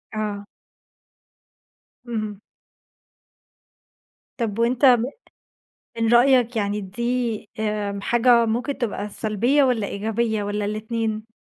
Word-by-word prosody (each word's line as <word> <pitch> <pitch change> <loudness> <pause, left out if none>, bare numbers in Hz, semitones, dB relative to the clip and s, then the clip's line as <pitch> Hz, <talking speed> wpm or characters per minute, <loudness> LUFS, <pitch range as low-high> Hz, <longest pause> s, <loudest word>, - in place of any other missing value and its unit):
آه. 205 -1 -3 1.6
اهم. 215 -3 -4 2.0
طَب 225 -2 -2
وأنت 245 +4 +2
ب 245 -3 +6 1.0
من 230 +1 +2
رأيك 245 -1 +4
يعني 205 -1 -1
دي 235 +3 -2
آمم، 210 -2 -2
حاجة 240 +2 +4
ممكن 240 +5 -2
تبقى 210 -3 -3
سلبية 230 +7 +1
والَّا 240 -6 +1
إيجابية 220 +1 -1
والَّا 205 0 -2
الاتنين؟ 220 +1 -3
225 Hz, 95 wpm, -23 LUFS, 210-240 Hz, 2.0 s, ب